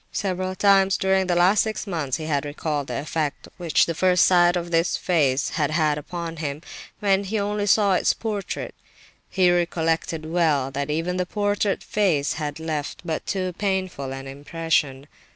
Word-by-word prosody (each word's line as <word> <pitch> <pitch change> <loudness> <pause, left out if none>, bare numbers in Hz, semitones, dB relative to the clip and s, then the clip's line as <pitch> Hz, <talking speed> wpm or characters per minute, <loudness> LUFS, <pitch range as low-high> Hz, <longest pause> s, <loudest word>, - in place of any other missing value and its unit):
Several 185 -1 -2
times 195 -1 +4
during 190 -1 +1
the 175 - +1
last 185 +4 +4
six 220 -1 -3
months 160 -9 -2
he 160 - -6
had 145 -3 0
recalled 145 -1 -3
the 125 - -4
effect 155 +1 -3
which 170 -3 +2
the 165 - -2
first 180 +1 +4
sight 175 -1 +4
of 175 -1 -3
this 165 +1 +2
face 145 -7 +1
had 150 -3 -1
had 155 -2 +1
upon 165 +1 -6
him, 150 0 -4 0.4
when 200 -1 +2
he 215 +3 -2
only 205 0 -1
saw 200 -1 +4
its 180 - +3
portrait. 210 -3 -4 0.6
He 185 -2 +3
recollected 165 -2 0
well 155 -5 +1
that 140 +1 -3
even 165 +4 -1
the 180 -1 -1
portrait 205 0 0
face 175 -9 +1
had 145 0 -4
left 155 -2 -4
but 160 -2 -3
too 185 -2 -2
painful 185 -9 -2
an 135 0 -6
impression. 145 -1 -2
170 Hz, 170 wpm, -23 LUFS, 150-190 Hz, 0.6 s, times